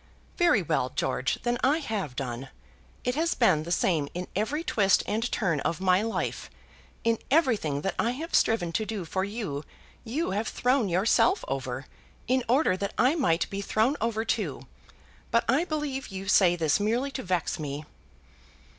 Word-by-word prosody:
"Very 350 0 +3
well, - - 0
George; - - -1
then 240 0 0
I 285 +4 +4
have 210 - -3
done. 125 0 -4 0.5
It 250 - 0
has 325 +4 0
been 190 -11 +4
the 170 +2 -6
same 160 -5 +1
in 180 +1 -4
every 275 - -1
twist 200 - +3
and 225 +4 -1
turn 165 -6 0
of 165 +4 -2
my 185 0 +3
life. 225 +1 -3 0.5
In 230 -1 +2
everything 225 - +2
that 195 - -1
I 230 - +2
have 320 +6 -6
striven 180 -7 +2
to 220 - 0
do 205 -5 -4
for 190 +3 -1
you, 200 -9 -4 0.4
you 265 - -2
have 210 +3 -1
thrown 250 -4 +1
yourself 210 - +3
over, 130 0 -3 0.4
in 255 0 +2
order 260 -5 +3
that 200 +1 -4
I 255 +5 +4
might 255 - +1
be 200 0 -3
thrown 220 +7 +1
over 225 0 0
too. 225 - -2 0.6
But 230 0 +2
I 275 +8 +3
believe 295 -5 -3
you 195 -1 -7
say 185 -3 +5
this 160 -1 +2
merely 235 +7 0
to 270 - -4
vex 180 -3 -1
me." 145 0 -5
215 Hz, 175 wpm, -27 LUFS, 175-255 Hz, 0.6 s, say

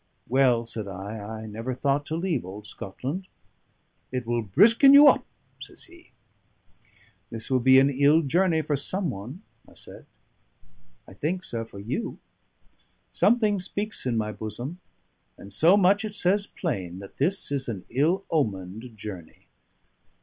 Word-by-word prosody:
"Well," 125 -2 +3
said 110 -3 -5
I, 100 +3 -7
"I 110 +2 -7
never 115 +4 -5
thought 140 +2 0
to 160 - -3
leave 170 -5 -1
old 100 +3 -9
Scotland." 135 - -6 0.8
"It 125 -2 -3
will 120 0 0
brisken 230 - +6
you 290 +1 +9
up," - - +4 0.3
says - - -7
he. 350 -2 -17 1.2
"This 115 +2 -6
will 130 - +3
be 130 +2 +6
an 135 +1 +5
ill 145 +4 +4
journey 165 +2 +1
for 150 - -1
someone," 140 - -3 0.3
I - - -20
said. - - -11 1.0
"I - - -13
think, 175 - -3
sir, 115 -7 -4
for 105 - -14
you. 120 - -4 0.9
Something 215 -3 +2
speaks 200 -2 -3
in 120 -2 0
my 105 -1 -1
bosom; 120 +10 -7 0.6
and 100 0 -12
so 170 - +5
much 200 +2 +3
it 210 -1 -5
says 200 +1 +2
plain 95 - -4
that 100 +1 -12
this 175 +3 +1
is 140 -2 0
an 100 -6 -5
ill 160 +10 +1
omened 110 - -3
journey." 95 -6 -10
130 Hz, 150 wpm, -26 LUFS, 110-180 Hz, 1.2 s, you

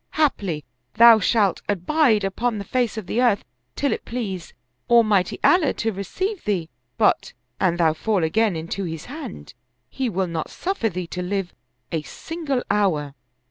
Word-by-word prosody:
Haply 195 - 0 0.3
thou 230 -1 +8
shalt 205 -2 +2
abide 215 - +2
upon 220 +4 -1
the 200 - -4
face 240 +1 -1
of 215 - -4
the 230 +7 0
earth 230 -5 +2 0.3
till 280 - +1
it - - -5
please 200 -8 -5 0.3
Almighty 215 -6 +4
Allah 350 -6 +4
to 225 - -1
receive 375 - -3
thee; 180 -6 -1 0.3
but, - - +2 0.3
an 175 -2 +2
thou 165 -2 +3
fall 190 +3 0
again 205 +4 +2
into 170 +4 -4
his 160 -1 -6
hand, 255 - -8 0.4
he 260 -2 -1
will 190 -2 0
not 165 -3 -4
suffer 355 - -2
thee 180 -1 -4
to 180 +2 -5
live 190 0 -2 0.4
a 160 - -1
single 290 - -4
hour." 170 -9 +1
205 Hz, 160 wpm, -23 LUFS, 175-240 Hz, 0.4 s, thou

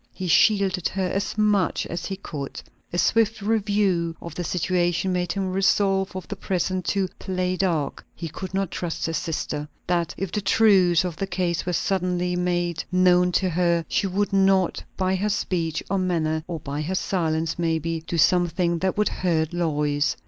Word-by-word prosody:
He 185 - -4
shielded 190 +1 +3
her 190 -1 -2
as 195 +3 -2
much 210 -4 +2
as 170 0 -4
he 195 - -3
could. 150 -8 -6 0.3
A 175 - -3
swift 225 +3 +2
review 200 -5 +1
of 170 - -8
the 175 - -4
situation 175 +1 0
made 180 -1 -1
him 190 -2 -2
resolve 195 0 +2
for 185 -1 -6
the 205 - -5
present 185 -1 -2
to 195 0 +1
"play 185 -1 -1
dark." 170 -7 -1
He 165 - -5
could 180 +4 -7
not 195 -2 -1
trust 170 -2 -3
his 165 0 -1
sister, 150 -3 -3 0.2
that 170 -2 0
if 195 -1 -3
the 210 - -1
truth 190 -4 +4
of 170 -4 -4
the 195 - -2
case 180 -2 -1
were 180 - 0
suddenly 180 -1 0
made 175 -1 -1
known 180 -1 +4
to 185 +1 +2
her, 170 -1 +1
she 195 - 0
would 200 +1 -1
not 195 -2 +3
by 185 0 +1
her 210 +3 0
speech, 165 -6 -1
or 195 0 0
manner, 160 -4 0
or 165 -2 -4
by 145 +1 -4
her 175 +5 -2
silence 165 -4 -1
maybe, 165 -1 -1
do 170 - -2
something 170 +1 +2
that 190 +2 -1
would 210 - +2
hurt 165 -2 0
Lois. 150 -4 0
180 Hz, 180 wpm, -24 LUFS, 165-190 Hz, 0.3 s, truth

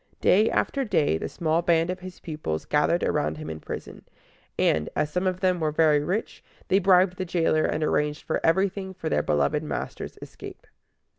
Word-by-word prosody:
Day 215 +4 +4
after 275 - 0
day 150 - +1
the - - -4
small 165 0 0
band 170 0 +2
of 185 - -5
his 185 0 -10
pupils 150 - -4
gathered 150 +4 +2
around 75 +1 0
him 80 +1 -6
in 80 - -7
prison; - - -8 0.5
and, 75 -1 +2
as 150 - 0
some 180 +3 0
of 185 0 -2
them 185 -2 +2
were 155 -1 +1
very 150 -1 +3
rich, 190 +8 -3 0.3
they 195 - +4
bribed 185 -1 +4
the 185 - -2
jailer, 165 -3 +1
and 155 - -1
arranged 150 -1 0 0.2
everything 190 +2 +1
for 165 -3 -4
their - - +2
beloved 70 -1 +1
master's - - -5
escape. - - -11
165 Hz, 180 wpm, -25 LUFS, 150-185 Hz, 0.5 s, Day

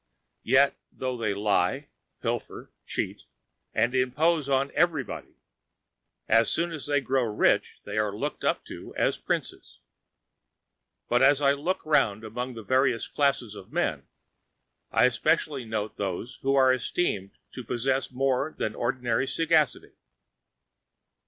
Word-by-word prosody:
Yet, 135 +3 +4 0.2
though 130 -1 -3
they 110 -4 -1
lie, 105 0 +1 0.3
pilfer, - - -4 0.2
cheat, - - -3 0.5
and 120 +3 +1
impose 140 +4 +1
on 135 +1 +1
everybody, 160 -7 -1 0.9
as 115 +1 +4
soon 170 +1 0
as 155 -4 -6
they 145 -1 +2
grow 135 0 +1
rich 110 -3 +1
they - - -3
are 105 -1 +1
looked 105 - -4
up - - 0
to - - -10
as - - +1
princes. - - -4 1.3
But 120 +1 +2
as 135 +1 +6
I 140 -1 +4
look 165 +7 -2
round 135 -9 +2
among 120 +3 -5
the 115 - -8
various 130 0 +2
classes 140 -6 0
of 95 - -11
men, - - -1 0.8
I 125 - +5
specially 150 -1 0
note 110 -1 -3
those 100 +5 -4
who 135 +1 +2
are 130 -1 +5
esteemed 110 - -2
to 125 - -7
possess 130 +4 -1
more 135 +3 0
than 110 - -2
ordinary 120 +1 -1
sagacity. 160 -3 +1
130 Hz, 135 wpm, -27 LUFS, 115-140 Hz, 1.3 s, as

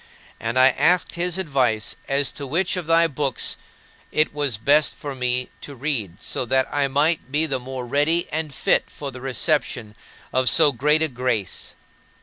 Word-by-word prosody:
And 115 +2 -2
I 130 +1 +7
asked 180 +7 +2
his 175 +1 -1
advice 130 - 0
as 140 -1 +1
to 140 - -7
which 175 +8 0
of 180 -4 -4
thy 165 0 +5
books 140 -4 -1 0.6
it 155 0 +1
was 145 -6 -1
best 145 +7 +3
for 145 -1 -6
me 125 -1 -1
to 140 - -8
read 120 - -2
so - - -2
that 130 +2 +2
I 145 -1 +2
might 145 +1 0
be 150 +3 +2
the 135 -4 -2
more 130 0 -6
ready 145 +7 +1
and 155 -1 -2
fit - - +1
for 140 -2 -7
the 125 0 -10
reception 130 -4 -1 0.4
of 130 0 +3
so 155 -3 +5
great 150 +5 +2
a - - +2
grace. 125 - -3
140 Hz, 175 wpm, -22 LUFS, 125-155 Hz, 0.6 s, I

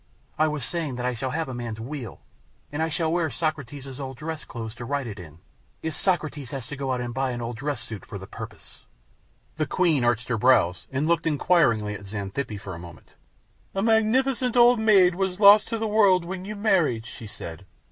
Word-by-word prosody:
I 155 - +5
was 150 -5 -3
saying 160 -5 -3
that 125 0 -3
I 125 - +1
shall 130 +3 -3
have 160 +4 -2
a 130 - -5
man's 120 -3 -5
wheel, 125 +1 -6 0.5
and 160 +2 -1
shall 160 0 0
wear 170 -2 +1
Socrates' 140 -4 -4
old 135 -2 -6
dress 155 +1 -5
clothes 110 -2 -7
to - - -3
ride 140 +1 -1
it 105 -3 -7
in, 80 -3 -11 0.5
if 160 - -2
Socrates 155 -8 -1
has 135 -3 -5
to - - -5
go 135 -1 -2
out 125 - 0
and 120 -1 -4
buy 135 +1 0
an 120 -1 -3
old 120 0 -4
dress 140 -1 -3
suit 110 -4 -7
for 100 - -8
the 95 - -9
purpose." - - -11 0.7
The 155 - 0
Queen 165 -8 +2
arched 120 +1 +1
her 115 -3 0
brows 105 -8 +3
and 140 +3 0
looked 170 0 +2
inquiringly 140 -9 +3
at 100 -1 -8
Xanthippe 100 +2 -4
for 95 -1 -7
a 85 - -7
moment. 85 -1 -13 0.6
"A 195 - 0
magnificent 245 +3 +2
old 240 0 +7
maid 195 -5 +5
was 190 +1 -2
lost 205 0 +8
to 230 - -2
the 225 - -2
world 200 -5 +4
when 185 +1 -5
you 210 +1 -5
married," 175 - +2
she 115 -1 -9
said. 95 -2 -9
140 Hz, 210 wpm, -25 LUFS, 120-175 Hz, 0.7 s, lost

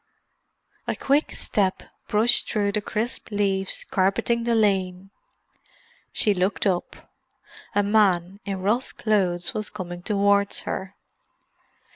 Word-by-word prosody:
A - - -1
quick 285 +3 +1
step 195 -3 0 0.2
brushed 220 +3 +3
through 205 -2 0
the 210 - -1
crisp 220 +4 -3
leaves 195 -2 -1
carpeting 230 +5 +1
the 235 -1 +2
lane. 195 -3 0 1.0
She 210 - +3
looked 190 +2 0
up. 185 -3 -2 0.6
A 205 - +3
man 200 -3 +2
in 195 -2 -4
rough 230 +6 -1
clothes 180 -5 +1
was 215 -1 -3
coming 175 -3 -7
towards 200 0 +2
her. 190 0 -5
200 Hz, 115 wpm, -24 LUFS, 190-215 Hz, 1.0 s, brushed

